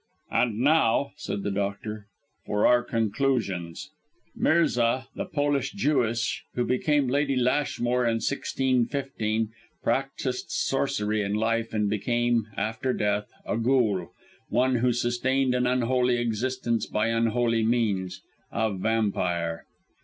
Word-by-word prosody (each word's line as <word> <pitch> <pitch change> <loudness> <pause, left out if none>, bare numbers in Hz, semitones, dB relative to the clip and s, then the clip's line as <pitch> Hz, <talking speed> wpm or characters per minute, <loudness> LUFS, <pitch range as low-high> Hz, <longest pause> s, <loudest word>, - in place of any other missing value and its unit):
"And 115 -4 +1
now," 140 -2 +3
said 100 -9 -4
the 100 - -1
doctor, 100 +1 -3 0.4
"for 105 0 +1
our 125 0 +5
conclusions. 110 -7 -1 0.4
Mirza, 125 -7 +2
the - - -3
Polish 145 -2 0
Jewess, 120 - 0
who 120 - +1
became 145 +2 +1
Lady 140 +1 +1
Lashmore 125 -1 +1
in 115 -1 +2
1615, 130 -3 -1 0.3
practised 130 +1 -1
sorcery 110 -6 0
in 100 0 -1
life 115 +1 0
and 105 -1 0
became, 120 +2 +1
after 110 +5 -1
death, 105 -1 -1
a - - -1
ghoul 115 -5 +1 0.4
one 130 0 +2
who 125 +1 +2
sustained 125 +2 +1
an 125 0 +1
unholy 125 0 +2
existence 120 0 -1
by 105 +2 0
unholy 115 0 +1
means 105 -6 0 0.3
a 110 -2 0
vampire." 90 -5 -1
120 Hz, 115 wpm, -26 LUFS, 110-130 Hz, 0.4 s, our